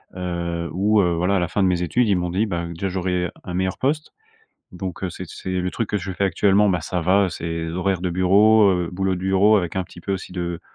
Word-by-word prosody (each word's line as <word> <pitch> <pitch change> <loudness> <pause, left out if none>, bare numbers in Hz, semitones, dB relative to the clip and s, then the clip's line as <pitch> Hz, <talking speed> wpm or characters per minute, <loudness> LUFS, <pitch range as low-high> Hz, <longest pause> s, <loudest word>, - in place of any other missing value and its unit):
heu, 85 -2 -3
où, 105 +4 +2
heu, 90 -2 +1
voilà 90 +4 +1
à - - +2
la 90 - 0
fin 95 +4 0
de - - +4
mes 90 -1 +1
études, 115 +8 +1
ils 100 - +4
m'ont 90 0 -2
dit, 95 +5 +1
bah, 85 -5 -3
heu, 85 - -6
déjà 95 +4 -3
j'aurais 90 -1 -1
un 90 - -6
meilleur 95 0 -1
poste 150 +3 -1 0.6
donc, 90 0 -6
heu, 95 - -1
c'est 95 +2 -7
c'est 95 - -9
le 90 0 -2
truc 115 +1 -3
que 105 - -1
je 95 0 -4
fais 100 - -1
actuellement, 100 +3 +3
bah, 90 -3 +1
ça 90 +3 -2
va, 95 +3 +3
c'est 85 - -5 0.2
des - - -4
horaires 90 0 -1
de 90 - -1
bureau, 100 +4 +5
heu, 90 -2 -1
boulot 95 +1 0
de 90 - -5
bureau 95 +3 +4
avec 90 -2 -2
un 95 - +1
petit 90 - -13
peu 100 - -3
aussi 95 -1 -5
de 85 -1 -4
90 Hz, 270 wpm, -22 LUFS, 90-100 Hz, 0.6 s, bureau